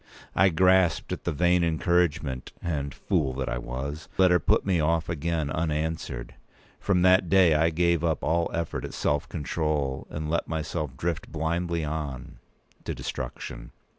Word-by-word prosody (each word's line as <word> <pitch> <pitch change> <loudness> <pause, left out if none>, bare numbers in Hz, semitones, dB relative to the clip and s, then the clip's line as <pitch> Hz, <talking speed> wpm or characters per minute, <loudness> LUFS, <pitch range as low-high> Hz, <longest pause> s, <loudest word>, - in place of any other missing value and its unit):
I 95 +1 +5
grasped 95 +1 +3
at - - -7
the 85 - +1
vain 90 +3 +3
encouragement, 80 -5 0
and, 70 -4 -2
fool 65 -1 -1
that 65 0 -3
I 60 - -2
was! 70 +6 -5
let 95 -1 +5
her 90 - +5
put - - +2
me 95 -3 +2
off 80 +1 +1
again 80 -2 -1
unanswered. 80 -5 -2 0.5
From 90 -3 +2
that 90 -1 +5
day, 95 -4 +6
I 80 +2 +3
gave 85 0 +1
up 80 -2 0
all 85 +1 +1
effort 85 -1 -3
at - - -6
self 75 0 0
control, 75 -3 -2
and 75 0 -4
let 85 +2 -1
myself 75 -3 -3
drift 85 -1 -3
blindly 85 +1 -1
on—to 70 -4 -7
destruction. - - -6
80 Hz, 155 wpm, -27 LUFS, 75-85 Hz, 0.5 s, day